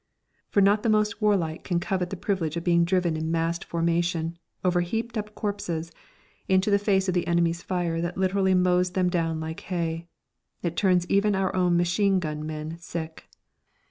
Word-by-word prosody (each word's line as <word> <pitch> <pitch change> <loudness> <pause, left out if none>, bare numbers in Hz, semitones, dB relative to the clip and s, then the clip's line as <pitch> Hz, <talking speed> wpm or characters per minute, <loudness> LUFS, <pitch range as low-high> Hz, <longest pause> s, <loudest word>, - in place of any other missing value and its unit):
For 200 - +3
not 200 +2 +4
the 230 - 0
most 215 0 +1
warlike 185 -7 +1
can 175 -3 0
covet 185 -1 -1
the 195 - -5
privilege 170 -5 -1
of 170 - -3
being 170 -1 +3
driven 175 -2 +1
in 160 0 -2
massed 165 +1 0
formation, 170 0 -1 0.3
over 180 -1 +3
heaped 225 +6 -3
up 210 -1 -4
corpses, 175 -6 -3 0.6
into 190 +2 +3
the 200 - +4
face 195 -2 +1
of 185 - +1
the 175 -1 0
enemy's 170 0 +1
fire 175 -3 -1
that 175 +1 -3
literally 190 0 +2
mows 180 0 +2
them 185 -1 +1
down 165 -2 0
like 160 +1 -5
hay. 170 -2 -3 0.6
It 170 -1 -2
turns 180 -2 +3
even 200 +2 +2
our 190 -1 0
own 180 -2 +3
machine 190 +3 +2
gun 155 -3 -4
men 155 +1 -5
sick. 160 -1 -7
175 Hz, 180 wpm, -26 LUFS, 165-195 Hz, 0.6 s, not